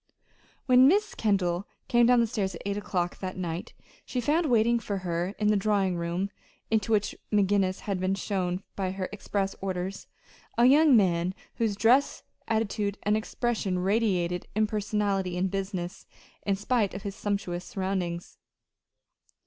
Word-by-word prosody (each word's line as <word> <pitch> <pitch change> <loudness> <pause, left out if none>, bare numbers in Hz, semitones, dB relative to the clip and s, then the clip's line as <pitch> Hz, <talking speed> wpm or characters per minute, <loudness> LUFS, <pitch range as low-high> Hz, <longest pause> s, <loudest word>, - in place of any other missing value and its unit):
When 255 0 +7
Miss 415 +7 +3
Kendall 190 -3 0 0.2
came 240 -1 +4
down 245 -1 +5
stairs 205 -5 -2
at - - -9
eight 200 0 -1
o'clock 185 -4 -2
that 185 -1 -5
night 175 +3 -4 0.3
she 255 - -3
found 305 +7 +1
waiting 235 -1 +3
for 205 -3 -3
her 175 +3 -2
in 210 -1 +2
the 210 - +4
drawing 200 -2 +1
room 175 +3 -2 0.4
into 220 0 +1
which 210 -1 +1 0.2
McGinnis 195 -2 +2
had 195 -3 -2
been 185 +1 0
shown 185 -2 -2
by 190 -2 -1
her 185 0 -4
express 200 -1 -2
orders 190 0 -4 0.5
a 235 - +5
young 285 0 +7
man 180 -2 +2 0.2
whose 220 -3 0
dress, 235 +7 +3 0.2
attitude, 215 -2 -1
and 210 +1 +2
expression 220 -3 -1
radiated 180 -3 0
impersonality 205 -3 0
and 185 +1 0
business, 190 -2 -4 0.4
in 200 - +3
spite 205 -1 0
of 195 - -6
his 200 - -4
sumptuous 190 -4 -2
surroundings. 185 -3 -3
200 Hz, 150 wpm, -28 LUFS, 185-220 Hz, 0.5 s, When